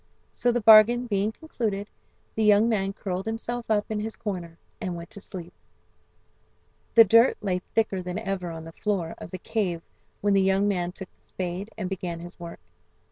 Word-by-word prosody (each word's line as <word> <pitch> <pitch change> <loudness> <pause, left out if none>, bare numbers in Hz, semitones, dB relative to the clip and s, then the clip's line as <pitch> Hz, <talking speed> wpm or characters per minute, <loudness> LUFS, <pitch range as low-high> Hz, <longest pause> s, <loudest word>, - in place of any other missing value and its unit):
So 245 - +1
the 240 0 0
bargain 220 +3 +7
being 205 -2 0
concluded, 220 -8 -3 0.5
the 220 - 0
young 210 +1 +5
man 195 -4 +1
curled 190 -1 -4
himself 230 +1 -4
up 210 -1 +2
in 215 - -1
his 220 +1 -4
corner 180 -6 -5 0.2
and 180 -2 -3
went 170 0 -9
to 200 - -9
sleep. 180 -3 -8 1.4
The 230 - +10
dirt 230 +4 +5
lay 185 -3 -1 0.2
thicker 215 -4 +1
than 180 +1 -4
ever 195 -5 -3
on 165 -1 -7
the 165 - -9
floor 180 -2 -2
of - - -8
the 185 - -6
cave 180 -4 -2 0.4
when 205 0 +2
the 195 - +4
young 195 +1 +3
man 180 -3 0
took 190 0 -9
the - - -27
spade 185 +3 -5
and 195 -4 -3
began 180 -3 -4
his 175 +2 -10
work. 170 -1 -8
195 Hz, 190 wpm, -26 LUFS, 180-220 Hz, 1.4 s, The